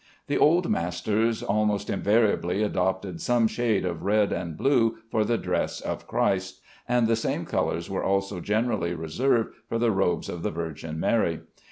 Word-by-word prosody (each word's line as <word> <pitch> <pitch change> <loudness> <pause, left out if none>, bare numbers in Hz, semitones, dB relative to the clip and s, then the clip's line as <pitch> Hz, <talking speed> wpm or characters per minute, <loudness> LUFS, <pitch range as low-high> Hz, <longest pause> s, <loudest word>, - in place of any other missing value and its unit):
The - - 0
old 170 +3 +4
masters 105 +7 0
almost 105 0 0
invariably 100 -2 +2
adopted 95 -3 -1
some 120 -2 +3
shade 110 -4 0
of 85 -3 -3
red 105 +1 +2
and 85 -4 -4
blue 115 - +2
for 110 - +2
the 115 +2 +1
dress - - -2
of - - -5
Christ, 95 -1 0 0.3
and 125 -1 +3
the 115 - +3
same 115 - -2
colors 85 0 -1
were 95 - -3
also 100 0 0
generally 105 -4 0
reserved 115 - 0 0.2
for 115 - -1
the 115 0 +2
robes 95 -3 0
of 85 - -5
the - - -1
Virgin 80 -1 -5
Mary. 85 -5 +1
100 Hz, 165 wpm, -26 LUFS, 90-115 Hz, 0.3 s, old